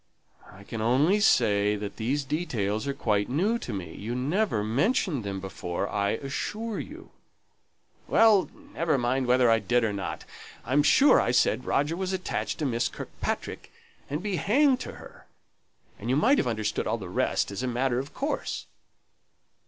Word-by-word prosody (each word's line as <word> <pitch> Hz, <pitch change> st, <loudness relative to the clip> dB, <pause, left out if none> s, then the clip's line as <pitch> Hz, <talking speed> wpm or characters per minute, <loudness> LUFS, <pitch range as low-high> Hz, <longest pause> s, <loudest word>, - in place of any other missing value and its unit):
"I 95 Hz, +2 st, -14 dB
can 110 Hz, +2 st, -6 dB
only 140 Hz, -, +3 dB
say 105 Hz, -, +3 dB
that 105 Hz, -1 st, -6 dB
these 135 Hz, +6 st, -1 dB
details 130 Hz, -, -2 dB
are 140 Hz, -, 0 dB
quite 105 Hz, -6 st, 0 dB
new 200 Hz, -, +1 dB
to 125 Hz, -, -6 dB
me; 90 Hz, -6 st, -5 dB
you 115 Hz, +4 st, -5 dB
never 145 Hz, -, 0 dB
mentioned 140 Hz, -, +1 dB
them 100 Hz, -1 st, -4 dB
before, 95 Hz, 0 st, -4 dB
I 100 Hz, 0 st, 0 dB
assure 210 Hz, -, -4 dB
you." 320 Hz, +4 st, -9 dB, 1.0 s
"Well; 215 Hz, -4 st, +5 dB, 0.2 s
never 165 Hz, -4 st, +1 dB
mind 125 Hz, +1 st, 0 dB
whether 125 Hz, 0 st, +4 dB
I 115 Hz, -, +4 dB
did 120 Hz, +4 st, +1 dB
or 110 Hz, -2 st, 0 dB
not. 100 Hz, -1 st, -5 dB, 0.4 s
I'm 140 Hz, +3 st, +3 dB
sure 270 Hz, -, +5 dB
I -, -, 0 dB
said 125 Hz, 0 st, +2 dB
Roger 145 Hz, +4 st, +1 dB
was 190 Hz, +1 st, -3 dB
attached 185 Hz, -1 st, -3 dB
to 155 Hz, -, -2 dB
Miss 120 Hz, -3 st, 0 dB
Kirkpatrick, -, -, -5 dB, 0.4 s
and 150 Hz, +5 st, -3 dB
be 205 Hz, -3 st, -1 dB
hanged 265 Hz, -, +3 dB
to -, -, -6 dB
her; -, -, -14 dB, 0.7 s
and 115 Hz, -, -5 dB
you 130 Hz, -, +3 dB
might 255 Hz, -, +4 dB
have -, -, 0 dB
understood 110 Hz, -3 st, -1 dB
all -, -, 0 dB
the -, -, -8 dB
rest -, -, 0 dB
as 100 Hz, -, -4 dB
a 130 Hz, -, -2 dB
matter 125 Hz, 0 st, 0 dB
of 140 Hz, +2 st, -6 dB
course." 285 Hz, +3 st, -3 dB
130 Hz, 170 wpm, -27 LUFS, 110-175 Hz, 1.0 s, Well